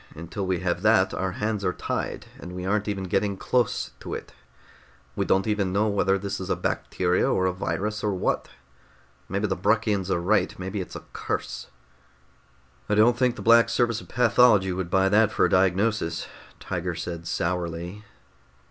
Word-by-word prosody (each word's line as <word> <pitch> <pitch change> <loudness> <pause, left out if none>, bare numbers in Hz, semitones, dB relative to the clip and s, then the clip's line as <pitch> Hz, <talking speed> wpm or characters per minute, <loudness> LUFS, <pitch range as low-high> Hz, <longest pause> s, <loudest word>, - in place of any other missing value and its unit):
Until 85 +4 -5
we 90 -1 0
have 90 -1 -1
that, 105 -2 +4
our 95 -1 -2
hands 105 0 -2
are 90 - +1
tied, - - -4
and 90 - -8
we 90 0 -5
aren't 105 +2 0
even 100 -2 -2
getting 95 +2 0
close 125 +1 0
to - - -5
it. - - -8 0.8
We - - 0
don't 95 - +3
even 105 -4 0
know 105 +3 +2
whether 100 -1 +2
this 100 +1 -4
is 95 - -6
a - - +2
bacteria, 90 0 0
or 95 - +1
a 95 - +1
virus, 105 +3 -3
or 105 - +1
what. 90 - -1 0.8
Maybe 100 +3 -1
the 95 -2 0
Bruckians 105 0 +1
are 95 - +1
right. 100 +5 +1
Maybe 95 +2 -4
it's 90 - -8
a - - -7
curse." - - -4 1.2
"I - - +2
don't 115 +3 +5
think 125 0 +1
the - - -8
Black 115 +1 +6
Service 120 -3 +1
of - - -14
Pathology 115 -5 +4
would 90 -1 -3
buy 95 +1 +3
that 105 +2 +4
for - - +2
a - - +1
diagnosis," 95 -1 +1 0.3
Tiger 90 -1 -3
said 85 0 -5
sourly. 85 +3 -3
95 Hz, 180 wpm, -25 LUFS, 90-105 Hz, 1.2 s, Black